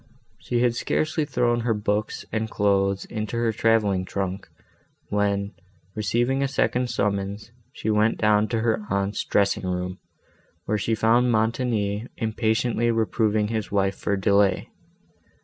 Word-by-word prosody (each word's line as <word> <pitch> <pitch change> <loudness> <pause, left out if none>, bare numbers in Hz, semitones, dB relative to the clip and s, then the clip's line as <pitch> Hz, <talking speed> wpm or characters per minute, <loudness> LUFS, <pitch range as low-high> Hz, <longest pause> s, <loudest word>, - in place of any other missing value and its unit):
She 120 -1 -1
had 120 -1 +3
scarcely 155 +5 0
thrown 120 -4 +1
her 115 -1 0
books 105 0 -2
and 110 0 -2
clothes 100 -2 +1
into 110 +1 -4
her 115 -1 +1
travelling 105 -4 +2
trunk, 95 0 -4 0.6
when, 100 0 0 0.4
receiving 120 +5 0
a 140 - +2
second 125 -2 0
summons, 100 +1 -2 0.2
she 110 - -2
went 110 +1 +2
down 105 0 +3
to 115 -1 -1
her 110 -1 +1
aunt's 100 +1 -1
dressing 100 -2 +1
room, 90 0 -3 0.7
where 105 - 0
she 115 +3 0
found 120 +3 +3
Montoni 110 -1 0
impatiently 115 +1 0
reproving 110 -2 +1
his 110 -2 -3
wife 100 -1 +1
for 100 - -1
delay. 100 0 +2
110 Hz, 135 wpm, -24 LUFS, 100-115 Hz, 0.7 s, had